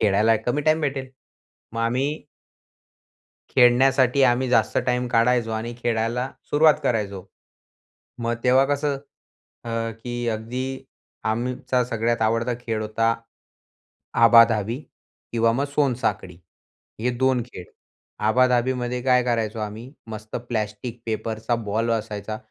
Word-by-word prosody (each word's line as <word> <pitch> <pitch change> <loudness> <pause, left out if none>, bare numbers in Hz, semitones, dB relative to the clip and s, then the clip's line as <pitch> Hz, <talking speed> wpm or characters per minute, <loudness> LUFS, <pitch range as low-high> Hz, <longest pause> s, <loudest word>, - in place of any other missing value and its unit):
खेळायला 110 +2 +3
कमी 140 +5 +1
टाईम 155 +1 +3
भेटेल. 135 -3 -2 0.6
मग 115 - -3
आम्ही 135 +6 -1 1.3
खेळण्यासाठी 130 +1 +4
आम्ही 125 +1 +3
जास्त 125 - +2
टाईम 125 0 +1
काढायचो 115 0 +2
आणि 115 +2 -4
खेळायला 120 +2 -1 0.2
सुरुवात 155 +1 +5
करायचो. 100 -5 -1 0.9
मग 120 0 -1
तेव्हा 130 +2 +5
कसं 145 0 0 0.7
अ, - - -7 0.4
की 120 -1 -3
अगदी 125 +4 -4 0.4
आमचा 125 +3 0
सगळ्यात 115 0 -1
आवडता 115 +2 +1
खेळ 115 -3 -3
होता 115 +2 +1 1.1
आबा-धाबी 115 -1 +5 0.6
किंवा 115 0 +3
मग 135 +4 0
सोनसाखळी, 115 - 0 0.6
हे 125 +2 +1
2 130 -1 +2
खेळ. 95 -7 -10 0.5
आबा-धाबीमध्ये 125 +2 +1
काय 125 -1 +4
करायचो 115 -2 -1
आम्ही, 110 +5 -6 0.2
मस्त 110 0 -6
प्लास्टिक 110 +1 -4
पेपरचा 110 +1 -2
बॉल 110 +3 0
असायचा, 110 -1 -3
120 Hz, 110 wpm, -23 LUFS, 110-125 Hz, 1.3 s, सुरुवात